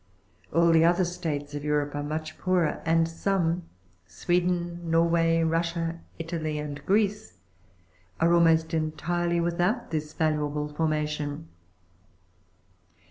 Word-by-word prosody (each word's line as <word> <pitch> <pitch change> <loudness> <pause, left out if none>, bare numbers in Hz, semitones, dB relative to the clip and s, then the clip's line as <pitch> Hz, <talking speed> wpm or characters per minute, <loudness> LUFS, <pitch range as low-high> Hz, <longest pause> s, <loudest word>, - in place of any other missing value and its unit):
Ah 165 - +3
1 170 - +5
the 165 0 +5
other 175 +2 +4
States 155 -5 -4
of 145 -1 -5
Europe 150 -1 0
are 145 - -3
much 155 +1 -4
poorer, 180 -3 +1
and 165 0 +3
some, 170 0 -1 0.4
Sweden, 175 -1 -1
Norway, 165 0 +3
Russia, 165 0 -1 0.2
Italy 160 -2 -3
and 145 -1 -5
Greece, 200 - +1 0.8
are 170 +1 +4
almost 165 -1 +4
entirely 170 +2 -1
without 175 +7 0
this 155 -1 -3
valuable 150 -2 0
formation. 150 0 -2
165 Hz, 115 wpm, -27 LUFS, 155-170 Hz, 0.8 s, 1